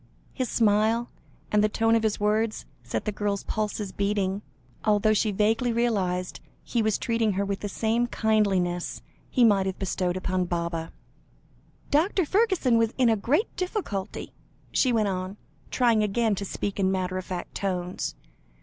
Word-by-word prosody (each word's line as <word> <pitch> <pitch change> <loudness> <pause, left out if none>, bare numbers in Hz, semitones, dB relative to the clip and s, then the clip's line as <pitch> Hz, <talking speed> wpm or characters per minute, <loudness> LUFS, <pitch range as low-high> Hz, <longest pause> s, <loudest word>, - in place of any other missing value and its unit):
His 255 -3 -2
smile, 220 +2 +2 0.4
and 210 0 +4
the 215 - +3
tone 225 +1 +2
of 230 - +4
his 220 -2 0
words, 215 +1 0 0.2
set - - -4
the 210 - 0
girl's 205 -1 -2
pulses 210 -2 -2
beating, 200 -1 -1 0.4
although 215 0 +3
she 215 +1 +2
vaguely 220 +4 +2
realised 195 -6 0 0.2
he 235 - 0
was 215 -2 +1
treating 230 -3 0
her 200 +2 0
with 200 0 -2
the 205 - -4
same 230 +4 0
kindliness, 195 -7 0 0.3
he 250 - +3
might 195 -3 +4
have 190 - -3
bestowed 185 -1 -1
upon 185 0 -1
Baba. 170 -1 -3 1.0
"Dr. 345 +5 +3
Fergusson 375 - +3
was 225 0 +1
in 250 -3 +4
a 225 - +4
great 280 - 0
difficulty," 360 - -4 0.4
she 255 - +3
went 220 -3 +2
on, 185 +1 -3 0.3
trying 235 -4 +3
again 215 +1 +1
to 200 0 -3
speak 200 +1 -4
in 190 -1 +2
matter 185 -1 -1
of 185 - -7
fact 180 -2 -5
tones. 180 -2 -3
210 Hz, 160 wpm, -26 LUFS, 190-230 Hz, 1.0 s, and